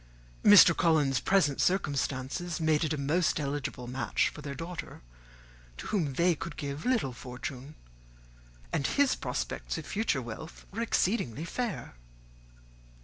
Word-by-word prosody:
Mr. 200 Hz, -5 st, +9 dB
Collins's 150 Hz, -6 st, +3 dB
present 175 Hz, -8 st, +2 dB
circumstances 145 Hz, -1 st, -1 dB
made 155 Hz, -1 st, +2 dB
it 155 Hz, -, -1 dB
a 155 Hz, -, 0 dB
most 155 Hz, +5 st, +1 dB
eligible 140 Hz, -3 st, -3 dB
match 125 Hz, +2 st, 0 dB
for -, -, -11 dB
their 140 Hz, -2 st, -6 dB
daughter, 165 Hz, -, -7 dB, 0.7 s
to -, -, -8 dB
whom 165 Hz, -10 st, -1 dB
they 170 Hz, +5 st, +3 dB
could 165 Hz, +2 st, -7 dB
give 145 Hz, +5 st, -4 dB
little 225 Hz, -, +1 dB
fortune; 130 Hz, +3 st, -7 dB, 1.0 s
and 140 Hz, -, +1 dB
his 285 Hz, -2 st, +3 dB
prospects -, -, -3 dB
of -, -, -6 dB
future 205 Hz, -9 st, 0 dB
wealth 120 Hz, +8 st, -9 dB
were 220 Hz, +4 st, -4 dB
exceedingly 175 Hz, -, 0 dB
fair. 190 Hz, -, -4 dB
155 Hz, 135 wpm, -30 LUFS, 135-180 Hz, 1.0 s, Mr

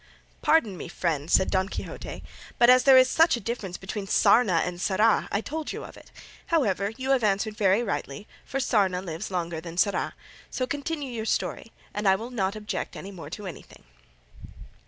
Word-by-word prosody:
"Pardon 225 Hz, -, +2 dB
me, -, -, -7 dB
friend," 165 Hz, -3 st, -2 dB
said 190 Hz, -, +3 dB
Don 190 Hz, 0 st, +1 dB
Quixote; -, -, -7 dB, 0.3 s
"but, 240 Hz, +1 st, +7 dB
as 255 Hz, 0 st, +5 dB
there 270 Hz, -1 st, +8 dB
is 255 Hz, 0 st, +7 dB
such 325 Hz, 0 st, +4 dB
a -, -, -6 dB
difference 210 Hz, -5 st, -4 dB
between 195 Hz, +1 st, -6 dB
sarna 195 Hz, -4 st, +4 dB
and 180 Hz, 0 st, -5 dB
Sarra, 210 Hz, +4 st, +2 dB
I 200 Hz, -, 0 dB
told 310 Hz, +5 st, -5 dB
you -, -, -6 dB
of -, -, -11 dB
it; -, -, -16 dB, 0.4 s
however, 205 Hz, -, +1 dB
you 265 Hz, +1 st, -2 dB
have 265 Hz, -3 st, +3 dB
answered 210 Hz, +1 st, +1 dB
very 200 Hz, +2 st, +3 dB
rightly, 145 Hz, -1 st, -4 dB, 0.2 s
for 270 Hz, -, -4 dB
sarna 200 Hz, -8 st, +2 dB
lives 180 Hz, +2 st, -6 dB
longer 170 Hz, -3 st, -3 dB
than 170 Hz, 0 st, -9 dB
Sarra: 200 Hz, +2 st, +1 dB, 0.3 s
so 255 Hz, -, -2 dB
continue 285 Hz, 0 st, -4 dB
your 220 Hz, -2 st, -4 dB
story, 225 Hz, -, -2 dB, 0.2 s
and 210 Hz, 0 st, -1 dB
I 190 Hz, -, +6 dB
will 230 Hz, +5 st, -6 dB
not 200 Hz, -4 st, -1 dB
object 215 Hz, 0 st, -4 dB
any 195 Hz, -, -8 dB
more 165 Hz, -6 st, -9 dB
to 205 Hz, +5 st, -7 dB
anything." 180 Hz, -, -10 dB
205 Hz, 190 wpm, -26 LUFS, 185-245 Hz, 0.4 s, there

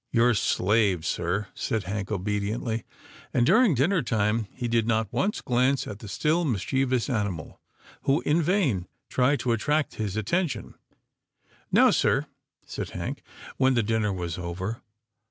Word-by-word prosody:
" -, -, -53 dB
Your 120 Hz, 0 st, +4 dB
slave, 100 Hz, -3 st, +2 dB
sir," 90 Hz, +4 st, -1 dB
said 110 Hz, -2 st, -2 dB
Hank, 100 Hz, +1 st, -4 dB
obediently, 105 Hz, +2 st, -2 dB, 0.5 s
and, 120 Hz, -, +4 dB
during 220 Hz, -, +5 dB
dinner 165 Hz, +8 st, +2 dB
time, 110 Hz, -2 st, 0 dB
he 125 Hz, -1 st, -4 dB
did 115 Hz, -1 st, +1 dB
not 110 Hz, -3 st, 0 dB
once 205 Hz, +2 st, 0 dB
glance 130 Hz, +2 st, +1 dB
at 105 Hz, -, -7 dB
the 110 Hz, -, -9 dB
still 155 Hz, -, +1 dB
mischievous 130 Hz, -, 0 dB
animal, 100 Hz, -, -3 dB, 0.4 s
who, 140 Hz, +4 st, +3 dB
in 155 Hz, +3 st, +2 dB
vain, 150 Hz, -, +1 dB, 0.2 s
tried 130 Hz, +3 st, +2 dB
to 125 Hz, -, 0 dB
attract 145 Hz, +7 st, 0 dB
his 105 Hz, -2 st, -3 dB
attention. 135 Hz, -, -1 dB, 0.5 s
" -, -, -37 dB, 0.2 s
Now, -, -, +6 dB
sir," -, -, +2 dB, 0.4 s
said -, -, -5 dB
Hank, -, -, -5 dB, 0.4 s
when 130 Hz, 0 st, +3 dB
the 120 Hz, -, +2 dB
dinner 110 Hz, -1 st, 0 dB
was 90 Hz, -2 st, -4 dB
over. 95 Hz, +6 st, -4 dB
115 Hz, 155 wpm, -26 LUFS, 100-135 Hz, 0.5 s, Now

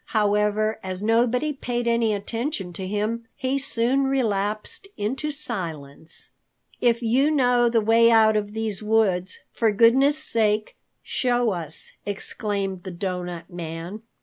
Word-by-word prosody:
However, 210 Hz, +1 st, +2 dB
as 185 Hz, +1 st, -5 dB
nobody 245 Hz, +6 st, +2 dB
paid 240 Hz, -3 st, -3 dB
any 235 Hz, -1 st, +2 dB
attention 210 Hz, -, -3 dB
to 185 Hz, +2 st, -5 dB
him, 215 Hz, +3 st, -2 dB
he 265 Hz, +2 st, -1 dB
soon 270 Hz, 0 st, +1 dB
relapsed 215 Hz, -, -1 dB
into 260 Hz, +9 st, -2 dB
silence. 165 Hz, -, -5 dB, 0.5 s
"If 235 Hz, 0 st, +2 dB
you 255 Hz, +6 st, +3 dB
know 245 Hz, -5 st, +3 dB
the 230 Hz, -1 st, +2 dB
way 230 Hz, +2 st, +5 dB
out 220 Hz, -1 st, +5 dB
of 205 Hz, -1 st, -1 dB
these 220 Hz, -3 st, -3 dB
woods, 205 Hz, -4 st, +1 dB
for 225 Hz, -3 st, +2 dB
goodness' 260 Hz, +7 st, +5 dB
sake 215 Hz, -7 st, 0 dB, 0.3 s
show 245 Hz, -3 st, +1 dB
us," 165 Hz, -3 st, -5 dB
exclaimed 200 Hz, -2 st, -3 dB
the 190 Hz, -, -7 dB
Doughnut 180 Hz, -1 st, -5 dB
Man. 170 Hz, +4 st, -6 dB
220 Hz, 130 wpm, -24 LUFS, 195-240 Hz, 0.5 s, way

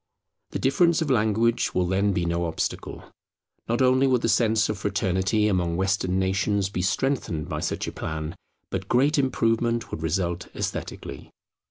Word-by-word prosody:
The -, -, -3 dB
difference 170 Hz, +5 st, +3 dB
of 145 Hz, -, -2 dB
language 115 Hz, 0 st, +2 dB
will 90 Hz, -, +2 dB
then 95 Hz, +3 st, +1 dB
be 90 Hz, -2 st, 0 dB
no 85 Hz, +1 st, 0 dB
obstacle. 80 Hz, -1 st, -4 dB, 0.7 s
Not 120 Hz, +3 st, +2 dB
only 130 Hz, +1 st, +4 dB
would 125 Hz, -2 st, +2 dB
the -, -, +2 dB
sense 110 Hz, -3 st, +3 dB
of 105 Hz, -2 st, -3 dB
fraternity 95 Hz, +1 st, +1 dB
among 90 Hz, -4 st, 0 dB
Western 95 Hz, -1 st, 0 dB
nations 95 Hz, +1 st, +1 dB
be 90 Hz, -, -3 dB
strengthened 95 Hz, -, -1 dB
by -, -, -3 dB
such -, -, -2 dB
a -, -, -3 dB
plan, 80 Hz, +2 st, -5 dB, 0.4 s
but 95 Hz, 0 st, -4 dB
great 140 Hz, +5 st, +3 dB
improvement 115 Hz, -3 st, 0 dB
would 80 Hz, -, -5 dB
result 85 Hz, +1 st, -1 dB
esthetically. -, -, -5 dB
100 Hz, 160 wpm, -25 LUFS, 90-120 Hz, 0.7 s, only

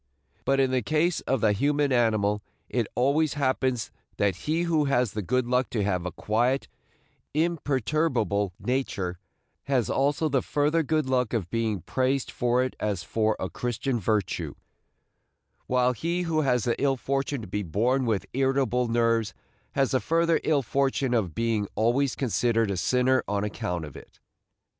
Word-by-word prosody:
But 135 Hz, 0 st, +2 dB
in 135 Hz, -1 st, +3 dB
the 130 Hz, -1 st, +1 dB
case 155 Hz, +7 st, +1 dB
of 130 Hz, -3 st, +1 dB
the 110 Hz, -, +4 dB
human 145 Hz, +5 st, +1 dB
animal 110 Hz, -4 st, +2 dB, 0.3 s
it 120 Hz, -4 st, 0 dB
always 140 Hz, +4 st, +2 dB
happens 130 Hz, -4 st, 0 dB, 0.3 s
that 100 Hz, -3 st, +2 dB
he 155 Hz, -, -1 dB
who 160 Hz, -3 st, +2 dB
has 125 Hz, -5 st, +1 dB
the 105 Hz, -, -3 dB
good 125 Hz, +5 st, 0 dB
luck 125 Hz, 0 st, +1 dB
to 105 Hz, -4 st, -1 dB
have 90 Hz, -3 st, -1 dB
a -, -, -4 dB
quiet, 120 Hz, +9 st, 0 dB, 0.7 s
imperturbable 140 Hz, -, 0 dB
nature 100 Hz, -9 st, -2 dB, 0.5 s
has 130 Hz, -6 st, +1 dB
also 145 Hz, +3 st, +1 dB
the 135 Hz, -3 st, +1 dB
further 150 Hz, +3 st, +1 dB
good 155 Hz, -1 st, 0 dB
luck 125 Hz, -3 st, 0 dB
of 100 Hz, -7 st, -2 dB
being 110 Hz, -5 st, -1 dB
praised 130 Hz, -, -1 dB
for 125 Hz, +1 st, +1 dB
it 130 Hz, -, -3 dB
as 100 Hz, -5 st, -2 dB
for 110 Hz, +4 st, 0 dB
a 95 Hz, -, -2 dB
Christian 120 Hz, +3 st, -2 dB
virtue, 105 Hz, -1 st, -1 dB, 1.1 s
while 125 Hz, 0 st, +2 dB
he 170 Hz, +8 st, -2 dB
who 160 Hz, -2 st, +1 dB
has 125 Hz, -5 st, +1 dB
the 120 Hz, -, -1 dB
ill 135 Hz, -1 st, +2 dB
fortune 135 Hz, +1 st, -2 dB
to 105 Hz, -, -8 dB
be 105 Hz, +3 st, -2 dB
born 120 Hz, +9 st, 0 dB
with 105 Hz, -5 st, 0 dB
irritable 130 Hz, -2 st, +1 dB
nerves 115 Hz, -1 st, +1 dB, 0.4 s
has 135 Hz, -2 st, +1 dB
the 130 Hz, -, +2 dB
further 165 Hz, +2 st, +2 dB
ill 145 Hz, -3 st, +2 dB
fortune 135 Hz, +1 st, 0 dB
of 95 Hz, -9 st, 0 dB
being 115 Hz, -3 st, 0 dB
always 125 Hz, +4 st, +2 dB
considered 115 Hz, -4 st, +1 dB
a 95 Hz, -, -2 dB
sinner 125 Hz, +8 st, +2 dB
on 100 Hz, 0 st, -1 dB
account 90 Hz, -5 st, -3 dB
of 75 Hz, -, -11 dB
it. -, -, -14 dB
125 Hz, 165 wpm, -26 LUFS, 110-140 Hz, 1.1 s, the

